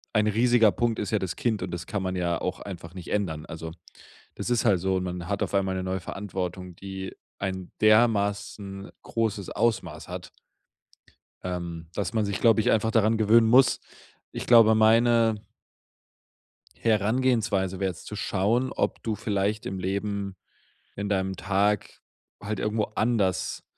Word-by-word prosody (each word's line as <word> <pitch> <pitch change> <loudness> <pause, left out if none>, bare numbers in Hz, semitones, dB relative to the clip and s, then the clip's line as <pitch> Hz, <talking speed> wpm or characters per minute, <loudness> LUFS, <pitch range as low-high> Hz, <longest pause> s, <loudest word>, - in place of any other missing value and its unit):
ein 105 0 +3
riesiger 115 0 +4
Punkt 120 0 0
ist 105 - -2
ja 110 - +3
das 95 -3 -3
Kind 110 -6 -1
und 90 - -4
das 85 0 -5
kann 100 -1 -2
man 95 0 -2
ja 85 -2 0
auch 90 - -3
einfach 85 -3 -8
nicht 90 -3 -9
ändern. 80 -7 -1
Also, 80 0 -7 0.6
das - - -4
ist 120 -1 +2
halt 100 -6 +3
so, 95 +1 0
man 90 -1 -5
hat 100 - -1
auf - - -7
einmal 95 -1 +1
'ne 95 - -3
neue 95 0 -2
Verantwortung, 90 -1 -5
die 95 0 -7 0.2
ein 95 -2 -4
dermaßen 100 -2 +2
großes 110 -4 -2
Ausmaß 95 -9 -1
hat - - -7 1.1
ähm, 85 -2 -5
dass 95 -3 -3
man 110 -2 +1
sich, 100 -2 -2
glaube 115 -1 +5
ich, - - +2
einfach 110 0 +2
daran 110 0 +3
gewöhnen 110 +1 +5
muss. 125 +1 +5 0.5
Ich - - -6
glaube, 115 -2 +7
meine 115 0 +4 1.4
Herangehensweise 110 -3 +1
wäre 95 -1 0
jetzt 85 - -13
zu 105 - -6
schauen, 110 +6 0
ob - - -1
du 110 -2 -1
vielleicht 105 -1 -1
im 95 0 -4
Leben 100 +1 -2 0.6
in 100 0 -3
deinem 95 -1 0
Tag 100 +1 0 0.4
halt 105 0 -3
irgendwo 105 0 0
anders 100 -6 0
100 Hz, 160 wpm, -26 LUFS, 95-110 Hz, 1.4 s, glaube